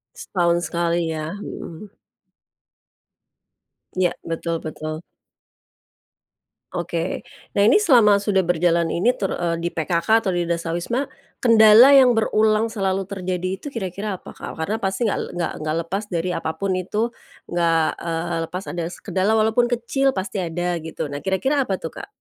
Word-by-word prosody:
Setahun 170 -2 0
sekali 170 -1 0
ya. 155 +3 -4
Hmm. 200 -1 -8 2.0
Iya, 185 -2 +2
betul 165 0 -3
betul. 155 0 -6 1.8
Oke. 170 0 -3 0.3
Nah, 200 - +4
ini 230 - +6
selama 235 - +5
sudah 200 -2 +1
berjalan 170 -1 +1
ini 235 +9 +2
ter 195 - -2
eee, 170 -1 -1
di 175 - -1
PKK 170 +7 +2
atau - - +2
di 175 - +1
Dasawisma, 170 +10 -2 0.3
kendala 230 +3 +8
yang 260 -2 +7
berulang 220 -1 +2
selalu 195 -4 -2
terjadi 185 -2 -3
itu 240 - -10
kira-kira 200 -3 -4
apa, - - -12
Kak? - - -7
Karena 190 +7 -1
pasti 220 +2 -1
nggak 205 - 0
nggak 175 -1 -2
nggak 155 0 -1
lepas 195 +5 -2
dari 180 +1 -1
apa 160 - -2
pun 195 -1 0
itu, 210 +5 -1 0.4
nggak, 165 -2 +2 0.2
eee, 170 +1 -2 0.2
lepas 185 +2 -4
ada 175 -1 -3
se - - -11
kendala 195 +3 0
walaupun 220 +3 +3
kecil 270 +3 +1
pasti 190 -2 -3
ada 175 +1 -2
gitu, 160 -1 -4
nah 145 0 -6
kira-kira 265 +10 +1
apa 195 -6 -2
tuh, 165 - -6
Kak? - - -8
185 Hz, 150 wpm, -22 LUFS, 170-215 Hz, 2.0 s, kendala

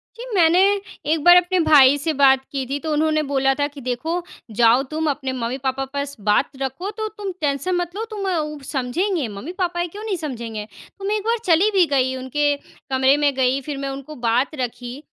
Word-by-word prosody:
जी, 475 - -8
मैंने 340 -1 +5 0.5
एक 315 -2 0
बार 350 0 +8
अपने 360 +1 +2
भाई 285 -4 +6
से 315 +3 -1
बात 265 -1 +5
की 270 -2 -2
थी, 280 +2 -2
तो 310 +2 -4
उन्होंने 310 0 +1
बोला 270 -1 +1
था 285 0 0
कि, 290 -1 -12
"देखो, 265 +8 -2 0.3
जाओ 235 +4 +4
तुम, 315 0 -1
अपने 275 -2 -2
मम्मी-पापा 260 +2 -2
पास 280 0 -3
बात 210 - +3
रखो, 270 +9 -3
तो 435 0 -4
तुम 405 -2 -4
टेंशन 295 +5 0
मत 350 0 -3
लो 440 +2 -3
तुम 400 -2 -3
अ 360 - 0
उ 300 -1 -4
समझेंगे, 285 - -1
मम्मी-पापा 345 - -4
हैं, 345 0 -1
क्यों 410 +5 -9
नहीं 420 -4 -2
समझेंगे।" 235 -9 -5 0.3
तो 390 - -6
मैं 415 +2 +1
एक 415 - -5
बार 465 +1 +1
चली 360 +3 +4
भी 380 -3 +4
गई, 260 -1 +1
उनके 285 +3 0 0.3
कमरे 265 +1 +4
में 290 -1 +2
गई, 260 +1 +1
फिर 285 +1 -5
मैं 275 0 -3
उनको 275 +3 -7
बात 250 +7 +1
रखी। 245 +1 -5
285 Hz, 210 wpm, -21 LUFS, 265-350 Hz, 0.5 s, बार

